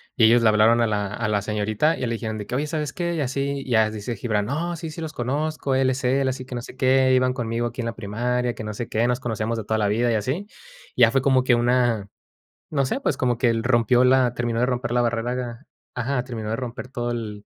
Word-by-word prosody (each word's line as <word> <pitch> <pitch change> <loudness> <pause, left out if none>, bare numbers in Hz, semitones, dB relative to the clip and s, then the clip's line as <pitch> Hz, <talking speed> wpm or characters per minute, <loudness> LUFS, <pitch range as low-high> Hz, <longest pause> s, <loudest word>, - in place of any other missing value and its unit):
y 115 -5 +5
ellos 120 +1 +5
le 110 - +5
hablaron 110 +2 +4
a 115 - +3
la 105 -1 -1
a 110 0 -2
la 105 -1 +1
señorita, 110 +8 0
y - - -9
ya 125 - 0
le 115 - -1
dijeron 110 -1 -4
de 105 - -6
que: 125 - -3
"Oye, 145 +3 0
¿sabes 150 -2 -2
qué? 170 -1 -2
Y 155 - -1
así." 140 +1 -2
Y - - -9
ya 110 -2 +3
dice 110 +2 -5
Gibrán: 105 -1 -1
"No, 170 +6 -2
sí, 165 0 -6
sí 155 - -9
los 160 -2 -5
conozco, 140 +2 -1
él 130 0 +3
es 130 +1 -4
él, 135 +2 +2
así 130 0 -2
que 125 - -7
no 120 - -3
sé - - -11
qué, 130 0 +3
iban 130 0 +3
conmigo 120 -1 -2
aquí 120 +1 -5
en - - -4
la 115 - -3
primaria, 120 +3 -2
que - - -7
no 105 0 -4
sé 115 +2 -5
qué, 115 +2 +1
nos 125 +1 0
conocíamos 115 -1 -2
de - - -4
toda 110 +1 0
la 105 -1 +1
vida 115 +3 +1
y - - +1
así". 135 - -2 0.5
Ya 115 -2 +6
fue 135 - +2
como 130 -2 +3
que 125 - +3
una 120 -4 +1 0.6
no 140 -3 +1
sé, 255 - -2
pues, - - -1
como 125 -2 +1
que 120 -2 +3
el 115 0 0
rompió 120 0 +3
la 125 -1 +4
terminó 120 -1 -1
de 125 - +3
romper 120 -1 -2
la 120 0 +2
barrera 120 +1 -1
ga 120 +1 -6 0.3
ajá, 125 +1 -1
terminó 115 -4 -5
de 110 - 0
romper 125 0 -6
todo 120 -2 -3
el 105 -3 -5
120 Hz, 275 wpm, -23 LUFS, 115-130 Hz, 0.6 s, Ya